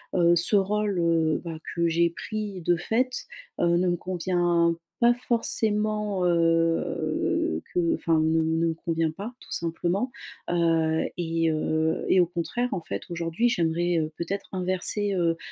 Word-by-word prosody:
heu, 175 -1 +5
ce 175 +5 +2
rôle, 205 0 +1
heu, 165 -2 +2
bah, 165 -2 -5 0.2
que 170 0 +2
j'ai 170 +1 +3
pris 205 +2 -5
de 175 +1 +2
fait, 250 +8 -1 0.3
heu, 175 - +3
ne 180 +1 +2
me 175 - +1
convient 175 -1 +1 0.3
pas 240 0 +6
forcément, 215 -4 0
heu, 165 - +1
que 170 -2 +2
enfin, 165 -1 +1
ne 160 +1 +2
ne 160 +1 +1
me 165 - 0
convient 165 -1 -1
pas, 200 +9 -7
tout - - -16
simplement. 175 +8 -1 0.4
Heu 165 -2 +2
et 165 -1 0
heu 160 +1 0
et 190 - +5
au 175 - +5
contraire, 175 +8 -2
en 185 - -2
fait, 100 -10 -5
aujourd'hui 170 +6 0
j'aimerais, 175 -5 +1
heu, 155 0 -2
peut-être 195 +4 -4
inverser, 185 +2 -1
heu 170 -2 +1
170 Hz, 155 wpm, -26 LUFS, 165-195 Hz, 0.4 s, pas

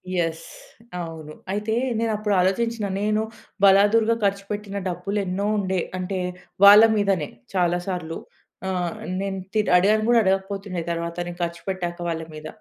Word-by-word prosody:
Yes. 165 -2 -1 0.5
అవును. 160 -3 -7 0.2
అయితే 210 +2 -1 0.3
నేనప్పుడు 215 -2 0
ఆలోచించిన. 220 +4 0 0.2
నేను 215 +1 +1 0.4
బలాదురుగా 205 +4 +5
ఖర్చుపెట్టిన 200 0 -2
డబ్బులెన్నో 190 +2 -2
ఉండే. 190 -2 0 0.2
అంటే 185 +1 -3 0.5
వాళ్ళ 205 +1 +10
మీదనే 195 -7 +1 0.3
చాలా 175 -1 +2
సార్లు. 175 -4 -3 0.5
ఆ! - - -1 0.5
నేను 195 -1 -3 0.2
తి 215 - +2 0.2
అడిగాను 210 +4 +3
గూడా 240 -1 +6
అడగకపోతుండే 195 -1 -1
తరువాత 170 0 -3
నేను 175 0 -8
ఖర్చు 170 0 -8
పెట్టాక 175 -2 -3
వాళ్ళ 165 -1 -2
మీద. 155 0 -8
195 Hz, 130 wpm, -23 LUFS, 175-205 Hz, 0.5 s, వాళ్ళ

